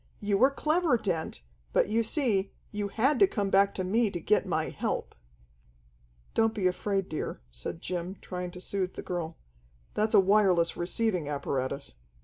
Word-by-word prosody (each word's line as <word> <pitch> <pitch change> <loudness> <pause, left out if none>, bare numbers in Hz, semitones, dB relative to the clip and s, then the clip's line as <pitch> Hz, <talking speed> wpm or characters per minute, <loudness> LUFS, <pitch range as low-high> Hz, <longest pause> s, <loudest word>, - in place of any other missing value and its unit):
You 205 -1 +1
were 260 +4 +7
clever, 305 0 +2
Dent, 170 - -3 0.3
but - - +4
you 220 +3 +2
see, 220 -5 +1 0.2
you 205 -1 -2
had 255 +8 +2
to 395 - +7
come 205 - -2
back 200 +1 +5
to 185 - -1
me 215 +4 +2
to 175 - -4
get 210 +6 +2
my - - 0
help." - - -3 1.2
"Don't 225 0 +2
be 200 -4 -1
afraid, 195 +1 0
dear," 155 - -4
said - - -6
Jim, 180 +1 -3
trying 180 -1 -5
to 180 - -10
soothe 185 0 -3
the - - -6
girl. 170 -2 -4 0.6
"That's 215 +1 +1
a - - +9
wireless 190 -4 +4
receiving 180 -3 -1
apparatus." 140 - -2
195 Hz, 165 wpm, -29 LUFS, 175-220 Hz, 1.2 s, a